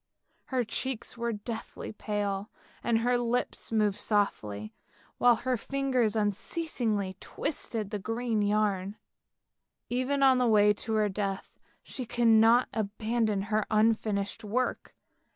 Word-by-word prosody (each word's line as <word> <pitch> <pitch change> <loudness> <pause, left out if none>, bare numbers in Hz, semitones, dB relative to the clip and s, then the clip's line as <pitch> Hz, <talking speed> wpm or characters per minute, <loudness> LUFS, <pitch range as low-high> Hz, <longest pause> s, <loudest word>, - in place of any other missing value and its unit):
Her 255 -2 0
cheeks 245 +1 -4
were 235 0 -2
deathly 220 +1 -6
pale, 205 -1 -3 0.3
and 235 -1 +2
her 245 +1 +2
lips 240 0 -2
moved 210 -3 +2
softly, 105 - -1 0.5
while 245 -1 +6
her 250 +3 -1
fingers 255 -3 0
unceasingly 210 - -1
twisted 225 -8 -4
the 210 - -2
green 225 +1 -1
yarn. 205 -1 0 0.9
Even 265 +3 +1
on 260 -1 +6
the 250 - +3
way 210 -2 +5
to 220 +2 -5
her 215 -1 +3
death 195 -1 -3 0.3
she 255 -3 -6
could 240 0 +1
not 225 +2 +6
abandon 215 -1 -1
her 215 -1 +1
unfinished 215 -2 +1
work. 245 +5 -2
220 Hz, 125 wpm, -29 LUFS, 205-240 Hz, 0.9 s, while